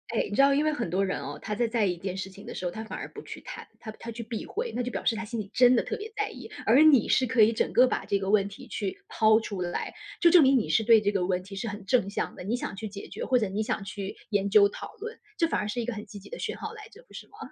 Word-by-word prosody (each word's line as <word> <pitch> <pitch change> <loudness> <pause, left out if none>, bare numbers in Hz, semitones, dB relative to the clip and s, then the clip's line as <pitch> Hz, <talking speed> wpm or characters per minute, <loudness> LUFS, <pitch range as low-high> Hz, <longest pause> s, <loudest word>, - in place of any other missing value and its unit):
哎， 230 - +1
你 205 - -3
知 - - +5
道， 275 0 +6
因 290 +2 +2
为 310 - +2
很 235 - -3
多 190 +3 +1
人 190 - -2
哦， - - -6
他 210 - -3
在 235 +2 +1
在 225 -2 +1
意 185 - +1
一 - - -10
件 190 +1 -4
事 190 0 -4
情 200 +2 -13
的 235 - -7
时 - - -5
候， 175 - -1
他 220 +4 -6
反 220 - -7
而 - - -5
不 - - -8
去 - - -8
谈， - - -9
他 220 - -7
他 230 +1 -8
去 230 +1 -7
避 225 -1 -5
讳， 470 +2 -4
那 245 - 0
就 250 - -3
表 - - -5
示 230 - +3
他 225 - -4
心 225 +2 -5
里 200 -2 -5
真 250 0 +6
的 235 - +4
特 - - -3
别 435 +2 -7
在 420 0 0
意。 - - -10 0.2
而 250 +6 +6
你 295 -8 +6
是 260 - +3
可 235 -1 +2
以 220 +2 +6
整 - - 0
个 255 +1 +6
把 - - -1
这 200 - 0
个 190 0 -3
问 200 -1 +4
题 200 - -12
去 200 -3 -4
抛 220 0 +4
出 200 -4 -5
来， 175 -1 -3 0.3
就 340 - +6
证 340 -2 +7
明 265 -1 +5
你 215 - -3
是 220 - +2
对 225 0 +7
这 205 -1 0
个 190 -3 +1
问 180 0 0
题 195 +1 -10
是 195 - -4
很 205 -1 -7
正 215 -3 +2
向 200 - -3
的， - - -8
你 220 +6 -1
想 225 - -5
去 215 +2 -5
解 200 0 -8
决， - - -6
或 255 -1 +3
者 215 - 0
你 200 +3 -2
想 210 - -2
去 200 0 -6
研 200 -1 +1
究 200 0 +7
讨 200 - -9
论， 450 +2 -7 0.2
这 330 - +3
反 - - 0
而 - - -3
是 240 - -2
一 235 - -1
个 245 - -3
很 210 -1 -7
积 205 0 -10
极 - - -14
的 - - -7
讯 - - -4
号 440 - -6
来 430 -1 -11
着， 460 +2 -17
不 - - -21
是 - - -8
吗？ - - -19
220 Hz, 365 characters per minute, -28 LUFS, 200-250 Hz, 0.3 s, 证